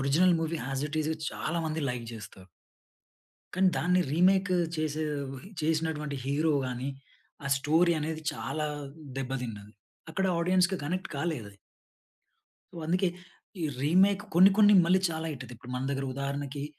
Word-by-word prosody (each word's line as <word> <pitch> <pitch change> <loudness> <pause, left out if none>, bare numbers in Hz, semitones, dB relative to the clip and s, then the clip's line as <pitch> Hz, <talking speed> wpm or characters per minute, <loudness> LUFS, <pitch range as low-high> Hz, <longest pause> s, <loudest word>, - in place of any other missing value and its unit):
Original 165 +7 +4
movie 165 0 -2
as 135 +1 -1
it 155 +1 -2
is 155 +1 0 0.2
చాలా 170 +2 -2
మంది 155 0 -2
like 120 -2 -5
చేస్తారు. 95 -3 -11 1.1
కానీ, 185 0 +4
దాన్ని 180 +2 +3
రీమేక్ 190 +3 +4 0.3
చేసే 155 0 -1 0.6
చేసినటువంటి 155 -2 -1
హీరో 150 +3 +1
గాని, 125 +1 -3 0.6
ఆ - - -3
స్టోరీ 160 +5 +3
అనేది 155 +1 -3
చాలా 155 -1 -3 0.5
దెబ్బతిన్నది. 120 -6 -5 0.4
అక్కడ 190 +4 0
ఆడియన్స్‌కి 180 +2 +3
కనెక్ట్ 185 +5 -2
కాలేద‌ది. 135 -11 -3 1.2
వ్ 165 - -5
అందుకే 185 +3 +2 0.5
ఈ - - -2 0.2
రీమెక్ 190 +6 +4
కొన్ని, 185 +3 +8
కొన్ని 210 -1 +7
మళ్ళీ 185 +2 +4
చాలా 160 0 -3
హిట్. 135 -3 -7
అత 125 - -11
ఇప్పుడు 125 +1 -10
మన 130 +2 -2
దగ్గర 135 -1 -2
ఉదాహరణకి 140 +1 -3
155 Hz, 140 wpm, -29 LUFS, 135-175 Hz, 1.2 s, కొన్ని